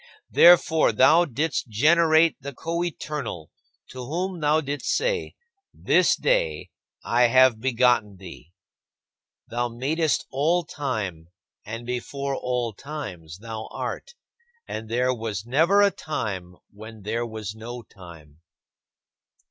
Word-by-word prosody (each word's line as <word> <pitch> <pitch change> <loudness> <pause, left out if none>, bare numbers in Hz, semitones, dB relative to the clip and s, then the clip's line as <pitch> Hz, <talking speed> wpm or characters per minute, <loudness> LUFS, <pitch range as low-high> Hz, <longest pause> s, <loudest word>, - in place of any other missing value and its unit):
Therefore, 165 -4 +6
thou 155 +10 +5
didst 150 +1 -2
generate 160 +6 +4
the 140 0 -7
Coeternal, 150 - -4 0.4
to 130 -1 -7
whom 180 +6 -3
thou 150 0 +2
didst 145 -1 -5
say, 475 +1 -1 0.4
"This - - +3
day - - 0 0.3
I 120 +1 +3
have 130 -2 +4
begotten 120 -5 +2
thee." 85 -3 -12 1.0
Thou 120 +1 -1
madest 145 +7 -1
all 165 +6 +1
time 110 - -4 0.4
and 115 +2 -6
before 135 +3 -3
all 125 -3 -2
times 90 - -8
thou 110 +1 -7
art, 485 -1 -6 0.5
and 110 0 -6
there 125 +2 +1
was 110 -4 -5
never 165 +11 +4
a 200 - +4
time 95 - -5 0.2
when 110 0 -12
there 115 +3 -2
was 110 -3 -6
no 120 +2 -8
time. 85 -7 -15
125 Hz, 115 wpm, -24 LUFS, 110-155 Hz, 1.0 s, Therefore